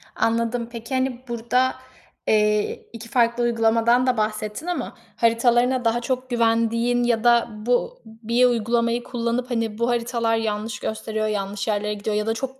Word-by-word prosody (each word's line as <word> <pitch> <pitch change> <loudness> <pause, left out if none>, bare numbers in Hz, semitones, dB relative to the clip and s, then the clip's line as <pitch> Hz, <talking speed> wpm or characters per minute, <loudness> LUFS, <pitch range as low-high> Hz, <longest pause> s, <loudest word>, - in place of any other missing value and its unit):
Anladım. 230 +1 0
Peki, 230 +1 -7
hani, 260 -1 -1
burada, 240 +2 +1 0.5
eee, 210 -1 +1
2 230 0 -9
farklı 240 -1 +2
uygulamadan 230 +1 +3
da 250 -2 +2
bahsettin 215 +6 -2
ama 355 - -3 0.2
haritalarına 240 +2 +2
daha 230 +1 +2
çok 255 +1 -3
güvendiğin 230 +1 +1
ya 235 -2 +1
da 235 -1 +4
bu 245 - -1
1 230 +2 +1
uygulamayı 235 0 +1
kullanıp, 240 +1 -2
hani, 225 -3 -1
"Bu 235 +1 0
haritalar 235 -1 0
yanlış 220 0 -2
gösteriyor, 220 0 -3
yanlış 200 -1 -3
yerlere 210 0 0
gidiyor 210 +1 -3
ya 210 0 0
da 225 - +2
çok 265 +3 -5
230 Hz, 155 wpm, -23 LUFS, 220-245 Hz, 0.5 s, da